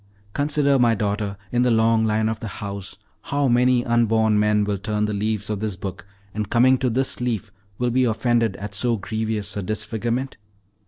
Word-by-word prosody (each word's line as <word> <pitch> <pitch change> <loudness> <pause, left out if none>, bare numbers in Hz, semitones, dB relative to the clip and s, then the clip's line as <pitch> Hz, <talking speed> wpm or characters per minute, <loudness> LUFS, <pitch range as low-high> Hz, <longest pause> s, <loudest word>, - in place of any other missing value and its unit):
Consider, 145 -1 +2
my 120 -2 +4
daughter, 100 -1 -2
in 125 - +2
the 125 - +3
long 115 -1 +3
life 110 0 +1
of 110 0 -2
the 115 - -5
house, 100 -1 -6 0.2
how 140 0 0
many 125 0 +3
unborn 110 -2 +2
men 105 0 +3
will 100 -1 -2
turn 105 +1 -1
the 105 - -2
leaves 105 0 -1
of 105 -2 -3
this 105 -2 -3
book, 95 +1 -7 0.3
and 105 -1 -3
coming 130 +2 +4
to 130 - +1
this 130 +2 -1
leaf 115 -4 -2 0.3
will 125 0 0
be 130 +1 +3
offended 115 -2 +1
at 100 +1 -7
so 115 +3 +1
grievous 110 0 -2
a 100 - -2
disfigurement! 110 +6 -3
110 Hz, 190 wpm, -23 LUFS, 105-120 Hz, 0.3 s, my